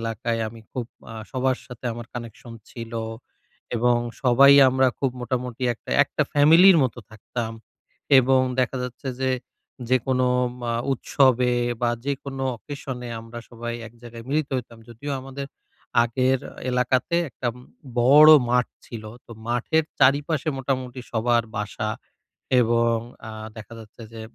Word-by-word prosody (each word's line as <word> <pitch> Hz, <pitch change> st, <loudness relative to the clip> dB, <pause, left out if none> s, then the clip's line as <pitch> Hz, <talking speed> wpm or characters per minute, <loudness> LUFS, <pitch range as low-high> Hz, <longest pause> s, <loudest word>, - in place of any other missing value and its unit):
এলাকায় 115 Hz, 0 st, -2 dB
আমি 115 Hz, 0 st, -12 dB
খুব 125 Hz, -2 st, -3 dB, 0.3 s
আ -, -, -9 dB, 0.2 s
সবার 130 Hz, 0 st, 0 dB
সাথে 125 Hz, 0 st, -12 dB
আমার 120 Hz, 0 st, -8 dB
কানেকশন 120 Hz, 0 st, -8 dB, 0.2 s
ছিল 115 Hz, -1 st, -8 dB, 0.8 s
এবং 120 Hz, +1 st, +3 dB, 0.3 s
সবাই 135 Hz, +2 st, +7 dB, 0.2 s
আমরা 130 Hz, 0 st, +3 dB
খুব 135 Hz, -2 st, 0 dB
মোটামুটি 125 Hz, 0 st, -4 dB
একটা, -, -, -12 dB
একটা 150 Hz, -, -1 dB
ফ্যামিলির 165 Hz, +6 st, +7 dB
মত 125 Hz, -, 0 dB, 0.2 s
থাকতাম। 110 Hz, +1 st, -5 dB, 0.7 s
এবং 130 Hz, +1 st, +3 dB, 0.2 s
দেখা 130 Hz, +1 st, 0 dB
যাচ্ছে 125 Hz, +2 st, -6 dB
যে 130 Hz, 0 st, +1 dB, 0.6 s
যেকোনো 130 Hz, 0 st, +2 dB, 0.4 s
মা 120 Hz, -, -1 dB, 0.2 s
উৎসবে 125 Hz, -1 st, +2 dB, 0.3 s
বা 120 Hz, -, +3 dB, 0.2 s
যেকোনো 135 Hz, -1 st, -3 dB
অকেশন 140 Hz, -1 st, -7 dB
এ -, -, -6 dB
আমরা 115 Hz, +1 st, -9 dB
সবাই 120 Hz, 0 st, -5 dB
এক 115 Hz, -, -13 dB
জায়গায় 115 Hz, -1 st, -10 dB
মিলিত 150 Hz, 0 st, 0 dB
হইতাম। 115 Hz, -2 st, -7 dB
যদিও 140 Hz, +5 st, -6 dB
আমাদের 135 Hz, +1 st, -7 dB, 0.6 s
আগের 130 Hz, +2 st, +1 dB, 0.3 s
এলাকাতে 125 Hz, +6 st, +1 dB
একটা 125 Hz, -1 st, -3 dB, 0.5 s
বড় 145 Hz, +5 st, +8 dB, 0.2 s
মাঠ 125 Hz, 0 st, +3 dB, 0.2 s
ছিল, 110 Hz, -2 st, -8 dB, 0.2 s
তো -, -, -18 dB, 0.2 s
মাঠের 140 Hz, +6 st, +1 dB, 0.2 s
চারিপাশে 145 Hz, +3 st, +3 dB
মোটামুটি 130 Hz, -1 st, -3 dB
সবার 120 Hz, 0 st, +2 dB
বাসা 105 Hz, +1 st, -3 dB, 0.7 s
এবং 115 Hz, 0 st, +2 dB, 0.3 s
আ -, -, -6 dB, 0.3 s
দেখা 110 Hz, +1 st, -10 dB
যাচ্ছে 110 Hz, +1 st, -13 dB
যে 115 Hz, -, -9 dB
125 Hz, 135 wpm, -24 LUFS, 115-135 Hz, 0.8 s, বড়